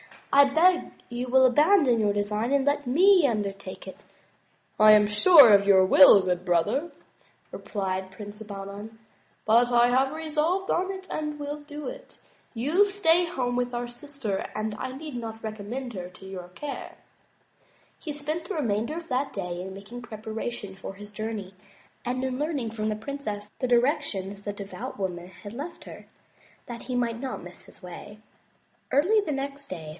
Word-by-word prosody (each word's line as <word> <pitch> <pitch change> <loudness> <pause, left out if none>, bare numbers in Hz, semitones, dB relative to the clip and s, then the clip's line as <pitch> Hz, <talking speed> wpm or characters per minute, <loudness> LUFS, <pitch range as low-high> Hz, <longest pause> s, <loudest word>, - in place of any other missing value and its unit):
I 280 0 +8
beg 340 +6 +3 0.2
you 245 +1 -4
will 260 +1 +5
abandon 295 - +4
your 205 -2 +2
design 210 +5 -1
and 275 -1 +2
let 285 -1 0
me 355 +4 +5
undertake 200 -4 -4
it." 190 - -9 0.5
" - - -40
I 215 - +10
am 210 0 +6
sure 235 - +8
of 200 0 +5
your 190 -2 +6
good 185 - -4
will, 190 -9 +7
brother," 185 - 0 0.6
replied 190 -2 -4
Prince 205 +2 -10
Bahman, 205 +1 -8 0.5
"but 235 +3 +4
I 240 0 +5
have 265 +3 +2
resolved 320 +4 -1
on 370 +2 0
it 380 -1 -8
and 300 -1 -3
will 290 0 -5
do 295 0 -8
it. - - -9 0.4
You 270 +8 -2
shall 410 - +7
stay 355 -4 +3
home 255 -8 -2
with 245 0 -1
our 240 0 -3
sister 240 -6 -4
and 215 0 -2
I 260 - -4
need 295 0 -8
not 225 -1 -7
recommend 220 +4 -5
her 180 -3 -6
to 180 +1 -14
your 185 -2 -8
care." 275 +11 -7 1.0
He 305 - -5
spent 305 +3 -4
the 400 - -4
remainder 235 -1 -1
of 335 0 -7
that 265 +2 -1
day 180 -3 -4
in 190 +1 -7
making 205 +5 -9
preparations 220 -3 -6
for 190 - -7
his 205 +1 -11
journey 210 -2 -5 0.5
and 255 +1 -2
in 260 0 -2
learning 290 -7 -2
from 215 -1 -3
the 215 - -1
princess 215 -4 -6
the 255 - 0
directions 235 - 0
the 205 - -4
devout 205 +5 -7
woman 180 -3 -4
had 200 +2 -11
left 290 +8 -7
her, - - -12 0.6
that 235 -1 -7
he 250 0 -4
might 235 -2 -1
not 260 -7 -5
miss 180 0 -12
his - - -15
way. 180 +4 -10 0.7
Early 355 +11 +4
the 380 -8 -2
next 280 +1 -5
day. 160 -4 -7
240 Hz, 175 wpm, -26 LUFS, 205-290 Hz, 1.0 s, I